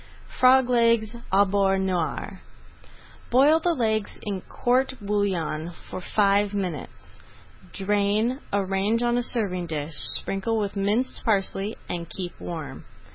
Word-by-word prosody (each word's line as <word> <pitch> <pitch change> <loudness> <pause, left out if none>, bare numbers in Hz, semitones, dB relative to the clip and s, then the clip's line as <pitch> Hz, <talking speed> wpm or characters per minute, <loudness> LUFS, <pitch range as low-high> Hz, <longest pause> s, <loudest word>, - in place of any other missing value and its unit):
FROG 255 0 +6
LEGS 230 -2 +2 0.2
AU 200 +1 +5
BEURRE 195 0 +2
NOIR 185 -4 -2 0.9
Boil 285 +6 +5
the 340 +1 +1
legs 220 -4 -1
in 200 -3 -3
court 260 +6 0
bouillon 190 -6 -1 0.2
for - - -5
five 200 +1 +2
minutes. 180 -7 -5 0.5
Drain, 210 +5 0
arrange 200 +3 0
on 240 0 +2
a 245 - +2
serving 195 -8 -1
dish, 155 -1 -4
sprinkle 195 - 0
with 205 -2 -2
minced 205 +6 0
parsley, 200 0 0
and 170 -1 -5
keep 180 +1 -5
warm. 155 -6 -6
200 Hz, 125 wpm, -25 LUFS, 185-230 Hz, 0.9 s, FROG